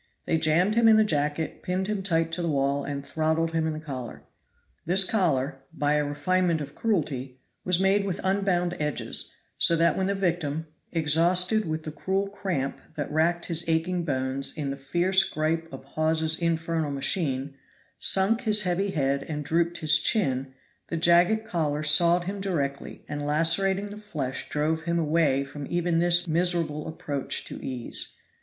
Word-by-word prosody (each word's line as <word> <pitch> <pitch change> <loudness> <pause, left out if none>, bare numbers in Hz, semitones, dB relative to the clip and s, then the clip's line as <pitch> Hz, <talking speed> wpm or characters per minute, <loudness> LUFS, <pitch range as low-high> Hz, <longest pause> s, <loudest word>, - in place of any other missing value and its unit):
They 160 - +1
jammed 165 +6 +2
him 230 0 +4
in 220 -1 +7
the 220 - +5
jacket, 150 -4 -2
pinned 185 +1 -2
him 205 -1 -2
tight 165 -4 +1
to 170 +2 -2
the 170 - -1
wall, 140 -1 0
and 140 -1 -5
throttled 160 +1 0
him 160 -1 0
in 160 - -2
the 155 - -5
collar. 130 -6 -7 0.6
This 190 +3 +3
collar, 155 -9 0
by 150 -2 0
a 150 0 +2
refinement 165 +4 0
of 145 -1 -7
cruelty, 140 - -2 0.2
was 180 -1 +2
made 195 +1 +3
with 195 -3 -3
unbound 190 -2 +1
edges, 150 -1 0 0.3
so 170 - +5
that 165 0 +3
when 190 - 0
the 200 - 0
victim, 165 -5 -1 0.3
exhausted 175 +6 +3
with 155 0 -3
the 155 - -5
cruel 190 +6 -1
cramp 180 -9 -3
that 145 - -4
racked 170 +3 +1
his 170 -1 -2
aching 170 +2 0
bones 135 -1 -1
in 140 -3 -2
the - - -3
fierce 175 +7 +2
gripe 165 0 -2
of 135 0 -9
Hawes's 160 +2 +1
infernal 165 -2 -1
machine, 140 -1 -1 0.5
sunk 195 +5 +2
his 215 -3 +2
heavy 185 +2 0
head 140 -5 0
and 150 -2 -4
drooped 170 +3 0
his 155 0 +5
chin, 135 - 0 0.3
the 165 - -3
jagged 175 +6 +4
collar 155 -6 -1
sawed 170 +3 +5
him 195 +2 -5
directly 145 -8 -3
and 145 0 -4
lacerating 190 +7 +2
the 210 - -8
flesh 150 -11 -5
drove 160 +2 -1
him 170 0 0
away 150 -4 +2
from 140 0 -8
even 175 -1 0
this 175 +1 +3
miserable 165 -2 0
approach 145 -3 -3
to - - -9
ease. 125 -3 -4
165 Hz, 170 wpm, -26 LUFS, 145-180 Hz, 0.6 s, in